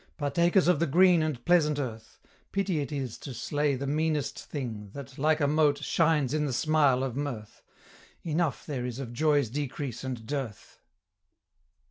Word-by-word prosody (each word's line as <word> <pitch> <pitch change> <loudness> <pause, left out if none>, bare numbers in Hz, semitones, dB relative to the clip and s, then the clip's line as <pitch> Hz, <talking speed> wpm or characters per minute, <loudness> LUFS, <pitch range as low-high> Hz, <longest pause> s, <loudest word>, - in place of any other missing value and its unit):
Partakers 170 +5 +2
of 180 -5 +4
the 170 - +1
green 175 +3 +5
and 150 -6 -3
pleasant 155 -4 +3
earth: 115 -5 -6 0.3
Pity 195 -4 0
it 145 +1 -3
is 135 -5 -4
to 135 -4 -7
slay 145 +3 0
the 135 +2 -4
meanest 150 0 -1
thing, 115 -8 -5
That, 140 -1 -9
like 155 +2 +3
a 145 - +2
mote, 145 0 +2
shines 155 -5 +2
in 150 -1 +1
the 135 - -2
smile 145 -2 +3
of 130 -3 -3
mirth: 130 -7 -5 0.6
Enough 165 -3 -1
there 135 -5 -3
is 125 -1 -5
of 125 -3 -6
joy's 145 0 +2
decrease 140 -2 -4
and 125 -4 -5
dearth!" 135 -5 -5
145 Hz, 165 wpm, -28 LUFS, 130-155 Hz, 0.6 s, green